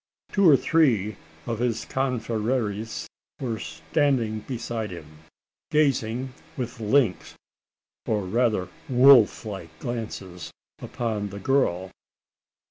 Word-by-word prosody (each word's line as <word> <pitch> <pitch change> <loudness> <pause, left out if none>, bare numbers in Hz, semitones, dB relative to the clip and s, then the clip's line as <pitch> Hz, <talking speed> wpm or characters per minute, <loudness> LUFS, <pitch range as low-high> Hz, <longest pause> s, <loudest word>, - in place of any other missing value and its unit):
Two 195 -4 +5
or 140 - +8
three 120 - +2 0.3
of 115 -2 -3
his 120 -2 -1
confreres 115 -4 -2 0.3
were 115 -4 -3
standing 110 - 0
beside 115 -2 -4
him 75 -3 -10 0.5
gazing 130 -4 +1 0.2
with 125 -1 -4
lynx, 110 -2 +1 0.7
or 105 -2 +1
rather 110 -2 +1 0.2
wolf 125 -3 +6
like 95 -6 -6
glances 95 -7 -6 0.3
upon 110 -4 -3
the 100 - -8
girl. 95 -7 +1
115 Hz, 100 wpm, -25 LUFS, 100-130 Hz, 0.7 s, or